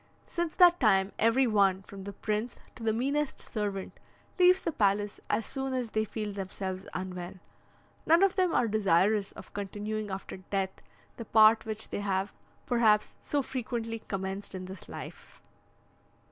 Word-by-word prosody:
Since 340 -2 -3
that 355 -1 +7
time 195 -5 +3
every 230 +4 +4
one, 195 -4 +3
from 195 0 -10
the 200 - -5
prince 215 +4 -2 0.2
to - - -12
the 225 -1 +1
meanest 275 +6 -1
servant, 205 -4 -4 0.4
leaves 365 +1 +7
the 335 - 0
palace 205 -4 +1
as 215 +2 +1
soon 270 -1 -3
as 245 -3 -2
they 220 0 +1
feel 210 -1 -4
themselves 190 -1 -5
unwell. 180 -1 -5 0.7
None 335 +4 +6
of 390 -1 +3
them 370 -2 +2
are 245 - +2
desirous 205 -1 +2
of - - -12
continuing 210 +1 -4
after 190 0 -6
death 190 0 -3 0.4
the 230 - -6
part 220 +1 +6
which 220 0 -4
they - - -3
have, 195 -1 -1 0.3
perhaps, 220 -4 +3
so 285 -1 -1
frequently 235 -3 -4
commenced 195 -1 -4
in 185 0 -5
this 185 -1 -10
life. - - -9
215 Hz, 160 wpm, -30 LUFS, 195-240 Hz, 0.7 s, that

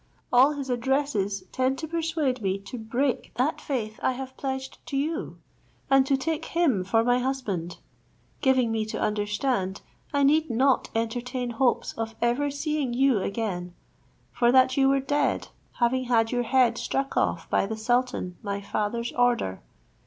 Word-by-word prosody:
All 260 +4 +6
his 280 -2 -5
addresses 240 -6 0
tend 260 +1 0
to 315 - -5
persuade 315 -6 -1
me 195 -1 0
to 235 +5 -8
break 245 +4 -1
that 265 +6 0
faith 220 -6 -3
I 260 - +1
have 260 +1 -7
pledged 265 -1 -4
to 275 - -2
you, 315 +5 -2 0.5
and 270 0 +5
to 275 - +3
take 315 +3 -2
him 300 - +1
for 225 +4 +2
my 245 +1 +3
husband; 215 -10 -3 0.6
giving 260 -4 +3
me 220 -1 0
to 215 - -5
understand, 210 -1 -1 0.3
I 285 -1 +2
need 310 +2 +3
not 260 +3 +2
entertain 245 +2 -2
hopes 245 +1 +1
of 225 0 -3
ever 240 +5 +1
seeing 285 -2 -2
you 265 -3 +3
again, 185 -4 -3 0.6
for 240 0 +3
that 260 0 +5
you 270 -1 +4
were 275 0 +3
dead, 285 +2 0 0.2
having 255 +1 +1
had 225 -2 +2
your 245 -1 0
head 245 -3 +3
struck 275 0 -2
off - - 0
by - - +2
the 220 +1 -4
sultan 235 -6 0
my 200 -1 -3
father's 215 +3 -2
order. 240 - +1
250 Hz, 160 wpm, -26 LUFS, 225-270 Hz, 0.6 s, All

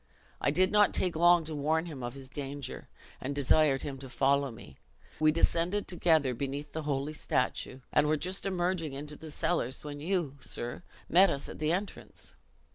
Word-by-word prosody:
I - - +3
did 185 +6 +3
not 210 -1 +5
take 180 -3 +1
long 175 +1 +5
to 160 0 -5
warn 155 +3 0
him 150 -6 -7
of 120 +1 -5
his 135 -1 -9
danger, 140 0 -6 0.3
and 140 +2 -3
desired 145 0 +3
him 135 -2 -5
to 135 -1 -9
follow 140 +1 +2
me. 110 - -12 0.4
We 155 0 +5
descended 170 +5 +1
together 160 -7 +2
beneath 140 +4 -4
the 160 - -3
holy 145 0 -2
statue, 130 -3 -1
and 150 0 +4
were 155 +1 +2
just 185 +5 -2
emerging 175 -5 -1
into 145 +2 -6
the 160 +1 -10
cellars 145 -4 -1
when 145 -1 -6
you, 160 -4 -1
sir, 120 +2 -5 0.3
met 190 +3 +6
us 140 -3 -3
at - - -9
the 155 0 +1
entrance. 195 +4 -5
150 Hz, 185 wpm, -30 LUFS, 140-170 Hz, 0.4 s, met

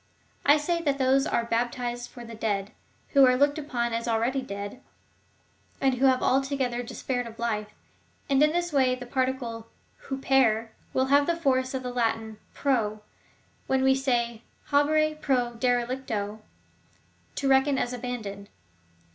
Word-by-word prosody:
I 290 +2 +7
say, 335 +3 -1
that 285 -4 0
those 270 0 +3
are 235 - 0
baptized 240 +1 -2
for 240 - -11
dead, 215 -3 -3 0.4
who 275 -2 +5
are 255 -1 +6
looked 285 +3 +2
upon 240 -5 -2
as 230 +1 -2
already 235 +4 +1
dead, 205 0 -7 1.0
and 270 -1 +2
who 260 +2 +3
have 260 -1 +3
alto 270 +2 +1
gether 245 -2 -1
despaired 245 0 -3
of 230 0 -11
life; 215 -3 -2 0.6
and 275 -1 +3
in 300 0 +5
this 345 0 -1
way 260 -2 +3
the 250 -1 -8
particle 245 -3 -2 0.4
vTrep 265 -5 +2 0.2
will 260 - +1
have 285 0 +5
the 340 - +2
force 260 -5 0
of 260 - -3
the 250 0 -4
Latin 225 -2 -1 0.2
pro, 240 -7 +1
as 215 - -15 0.7
when 265 0 +2
we 265 0 +5
say, 240 -4 0 0.3
habere 310 +2 +2
pro 250 -4 +1
derelicto; 235 -3 -1 0.5
— - - -36
to 275 - -1
reckon 270 +1 +4
as 245 -1 -1
abajidoned? 225 -5 -5
255 Hz, 155 wpm, -27 LUFS, 230-270 Hz, 1.0 s, I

